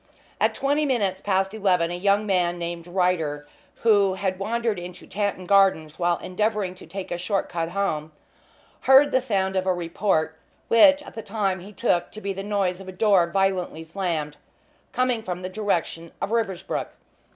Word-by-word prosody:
At - - +2
twenty 285 +2 +1
minutes 205 -9 0
past 195 0 0
eleven 180 -5 +1
a - - -3
young 200 +3 +2
man 180 -3 +1
named 170 0 -5
Ryder, 170 -5 0 0.3
who 200 -4 +4
had 190 -1 -2
wandered 225 0 -1
into 175 +1 -9
Tanton 200 -2 -2
Gardens 185 -5 +3
while 175 -1 +2
endeavouring 210 0 -1
to 185 - -14
take 190 +3 -7
a 175 - -2
short 195 +2 -1
cut 165 -1 -2
home, 165 -5 -2 0.8
heard 275 +2 +7
the 260 - +3
sound 195 -6 -1
of 190 0 0
a 185 - +3
report, 170 -2 -1 0.3
which 285 +5 +6
at - - -12
the 225 - -6
time 200 -3 -1
he 195 +4 -11
took 180 -5 0
to 215 - -8
be 200 -2 -3
the 195 - -5
noise 195 -3 -1
of 195 - -11
a - - -5
door 185 -3 +3
violently 185 -3 0
slammed, 160 -4 -3 0.5
coming 250 -2 +1
from 180 -3 -5
the 185 - -3
direction 180 -5 -2
of 200 - -3
Riversbrook. 195 -5 -1
190 Hz, 175 wpm, -24 LUFS, 175-210 Hz, 0.8 s, heard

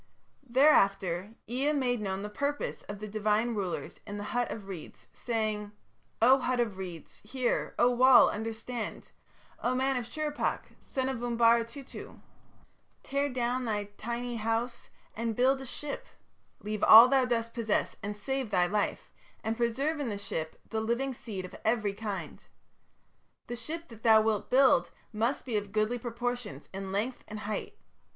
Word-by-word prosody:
"Thereafter 200 - +3
Ea 265 +6 0
made 250 -5 0
known 195 -1 -3
the - - -3
purpose 285 +7 -2
of 205 - -5
the 215 +1 -6
divine 215 +2 +1
rulers 195 -5 -4
in 205 - -5
the 205 - -4
hut 245 0 +1
of 205 -3 -6
reeds, 185 -5 -9
saying: 215 -3 -2 0.5
'O 260 +3 +7
hut 255 -1 0
of 220 -5 0
reeds, 175 -4 -8
hear; 250 +3 -1
O 245 - +5
wall, 250 +1 +7
understand... 225 +2 -5 0.5
O 250 +1 +1
man 265 +1 +1
of 240 -2 -3
Shurippak, 300 +3 -2
son 260 -1 -3
of 260 -3 -3
Umbara 235 -1 +4
Tutu, 260 +3 -10 0.9
tear 280 +1 0
down 250 0 -1
thy 205 -2 -2 0.5
house 230 +2 -2 0.3
and 230 0 -2
build 265 +3 +3
a 265 - -7
ship; 285 +3 -5 0.5
leave 210 0 -3
all 225 +3 +11
thou 265 0 +4
dost 230 -2 -1
possess 225 -3 0
and 205 +1 -4
save 265 +3 -3
thy 180 -3 +3
life, 205 +3 -1 0.3
and 220 +1 -1
preserve 260 +7 0
in 275 -5 -2
the 205 - -3
ship 165 -6 -5
the 220 -1 -1
living 240 +4 -1
seed 205 -6 -6
of 185 - -11
every 220 -3 +1
kind. 205 -1 -6 1.0
The 240 - -5
ship 330 +7 -6
that 225 -2 -13
thou 220 -1 +6
wilt 215 -2 0
build 255 -10 +5 0.2
must 230 +6 0
be 235 -5 -1
of 205 -1 -4
goodly 215 +3 0
proportions 240 -1 -4
in 195 0 -5
length 220 +6 -2
and 210 0 -7
height. 210 +1 -4
230 Hz, 160 wpm, -30 LUFS, 210-250 Hz, 1.0 s, all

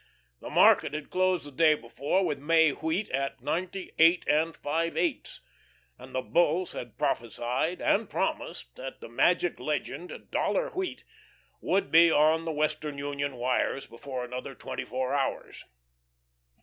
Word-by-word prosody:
The - - -8
market 145 - +5
had 150 -1 -6
closed 185 -3 +1
the 145 - -9
day 155 +2 +4
before 145 +9 -1
with 145 - -2
May 160 +1 +4
wheat 160 +8 -2
at 135 +1 -2
ninety 180 +5 -3
eight 165 +2 +5
and 160 +2 +2
five 165 +3 -1
eighths, 335 -6 -2 0.5
and - - -12
the 130 - -1
Bulls 175 +1 +1
had 120 -2 -8
prophesied 125 - -1
and - - +2
promised - - -3
that 130 +1 -7
the - - -9
magic 175 +9 +2
legend 155 +3 -3 0.2
"Dollar - - 0
wheat" 375 0 -4 0.6
would 195 - 0
be 165 +1 +7
on 160 +1 +3
the 165 - -1
Western 150 -1 -2
Union 140 -1 -3
wires 125 +2 0
before 125 +2 -6
another 125 +2 -6
twenty - - -6
four 130 0 -2
hours. 140 -1 -2
150 Hz, 150 wpm, -28 LUFS, 135-165 Hz, 0.6 s, be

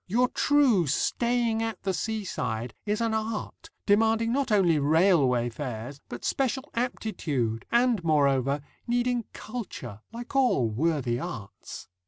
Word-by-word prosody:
Your 245 +6 +2
true 260 - +3
staying 235 - +1
at 225 -1 -4
the 190 - 0
seaside 125 - -3
is 210 +2 0
an 230 -1 +1
art, 220 0 -4 0.2
demanding 225 +2 +3
not 270 -2 0
only 180 -7 +4
railway 145 -5 +3
fares 125 +1 -6
but 120 - -7
special 265 +1 -1
aptitude, 150 - -2
and, 235 -5 +3
moreover, 140 -3 +2 0.3
needing 240 -1 0
culture, 185 - -7
like 240 +4 -8
all 245 - +3
worthy 130 -2 0
arts. 100 -5 -8
200 Hz, 125 wpm, -27 LUFS, -, 0.3 s, only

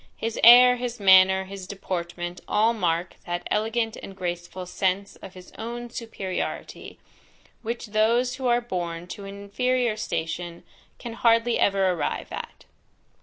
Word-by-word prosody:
His 225 0 -3
air, 250 +2 +9
his 245 -1 -4
manner, 190 -1 +6
his 190 -1 -9
deportment 175 -2 -5
all 220 +2 +3
mark 175 -4 -1
that 175 0 -3
elegant 225 +1 0
and 195 - -10
graceful 175 0 -5
sense 190 +2 -1
of 190 -1 -12
his 185 0 -13
own 240 +1 -6
superiority, 210 -6 -5 0.6
which 235 +1 -4
those 230 +4 +1
who 260 -1 -2
are 240 0 +3
born 175 -6 -4
to 200 - -8
an 200 0 -8
inferior 245 +3 0
station 170 -4 -4 0.3
can 235 - -7
hardly 230 0 +2
ever 195 -2 +3
arrive 175 - -3
at. - - -8
200 Hz, 140 wpm, -25 LUFS, 180-235 Hz, 0.6 s, air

